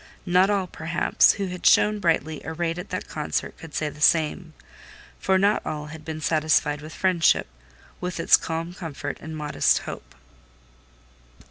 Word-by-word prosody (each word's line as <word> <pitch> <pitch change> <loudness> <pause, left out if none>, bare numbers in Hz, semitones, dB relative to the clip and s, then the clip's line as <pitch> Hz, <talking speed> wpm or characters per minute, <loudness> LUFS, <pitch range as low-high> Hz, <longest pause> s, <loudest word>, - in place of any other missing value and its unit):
Not 180 +1 +4
all, 200 -2 +1
perhaps, 170 -1 +2
who 200 - -3
had 180 0 -7
shone 210 0 +4
brightly 160 -4 0
arrayed 165 +2 -3
at 180 - -8
that 185 - -4
concert 150 -1 -3
could 165 -2 -11
say 155 - -1
the 150 0 -9
same; 160 +1 +2 0.6
for 190 0 +2
not 200 +2 +2
all 150 -1 -4
had 160 -1 -10
been 155 0 -6
satisfied 155 -1 +1
with 155 +1 -9
friendship—with 165 - -1
its 165 - +6
calm 165 +2 -3
comfort 145 -5 -6
and 160 0 -7
modest 150 -1 +2
hope. - - -9
160 Hz, 150 wpm, -24 LUFS, 150-180 Hz, 0.6 s, its